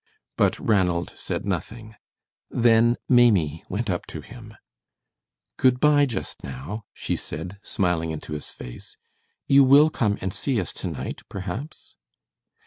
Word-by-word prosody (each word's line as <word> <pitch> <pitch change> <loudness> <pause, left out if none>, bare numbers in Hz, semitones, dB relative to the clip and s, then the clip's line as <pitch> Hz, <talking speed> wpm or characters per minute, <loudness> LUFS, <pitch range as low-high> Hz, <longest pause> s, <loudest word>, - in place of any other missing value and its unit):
But - - +2
Ranald 90 -5 +1
said - - -4
nothing. 110 +4 -4 0.6
Then 120 0 +4
Maimie 100 - +4
went 110 +5 -2
up 90 -3 -2
to 80 - -7
him. 110 - -12 1.0
"Good 125 -1 +3
by, 145 -1 +5
just 120 - -5
now," 70 - -6
she - - -3
said, 90 +6 -6
smiling 90 -5 0
into 75 -1 -6
his 75 - -6
face. - - -11 0.5
"You 140 0 +6
will 145 +4 +6
come 105 -8 0
and 95 -1 -3
see 130 -5 0
us 90 - -3
to - - -5
night, - - -5
perhaps?" 100 - -7
105 Hz, 135 wpm, -24 LUFS, 85-120 Hz, 1.0 s, You